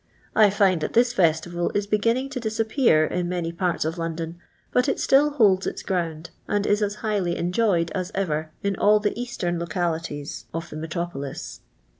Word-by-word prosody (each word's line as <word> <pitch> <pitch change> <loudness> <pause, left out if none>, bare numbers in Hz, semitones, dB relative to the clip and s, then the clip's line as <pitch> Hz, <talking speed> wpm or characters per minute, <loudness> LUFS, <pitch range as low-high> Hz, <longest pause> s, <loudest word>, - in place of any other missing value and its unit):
I 215 -2 +7
find 195 -4 +2
that - - -3
this 240 +1 +4
festival 175 -2 +1
is 205 0 +1
beginning 230 +6 +1
to 270 - -3
disappear 220 - +2
in 175 +2 -2
many 175 -2 -2
paru 170 -2 -1
of 165 +2 -4
London, 165 0 -4 0.3
but 250 +3 +2
it - - -1
still 280 +2 +4
holds 205 -10 +3
its - - -4
grosind, 170 -3 -3 0.2
and 205 0 0
is 205 0 +2
as 205 0 0
highly 195 -5 0
enjoyed 180 -1 +1
as 185 -2 -3
ever, 160 -5 -1
in 200 0 0
all 210 +1 +5
the 210 0 0
eastern 210 -8 -3
localities 165 -4 -3
of 165 0 -5
the - - -7
metropolis. 160 -3 -5
180 Hz, 175 wpm, -24 LUFS, 165-210 Hz, 0.3 s, I